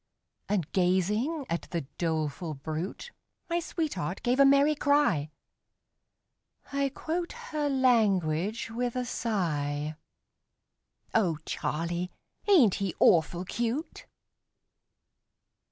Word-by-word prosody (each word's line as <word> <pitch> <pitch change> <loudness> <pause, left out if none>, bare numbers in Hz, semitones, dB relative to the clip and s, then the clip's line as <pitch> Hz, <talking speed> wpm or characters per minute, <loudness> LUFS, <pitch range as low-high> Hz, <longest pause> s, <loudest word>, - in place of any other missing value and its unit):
And 200 -6 +1
gazing 210 - +1
at 170 - -3
the 170 -2 -2 0.2
doleful 160 -1 -1
brute 160 - -5 0.4
My 340 - +2
sweetheart 240 - -3
gave 250 +2 +1
a 275 - +8
merry 280 +2 +5
cry 285 - +2 1.4
I 280 0 +1
quote 335 +5 -3
her 310 -12 -3
language 215 - +2
with 245 +1 -2
a 250 0 -1
sigh 155 -11 -1 1.2
"O 180 -8 +2
Charlie, 170 +3 -2 0.4
ain't 275 - +6
he 195 -4 -1
awful 175 +2 +4
cute?" 240 - -3
210 Hz, 95 wpm, -29 LUFS, 170-275 Hz, 1.4 s, a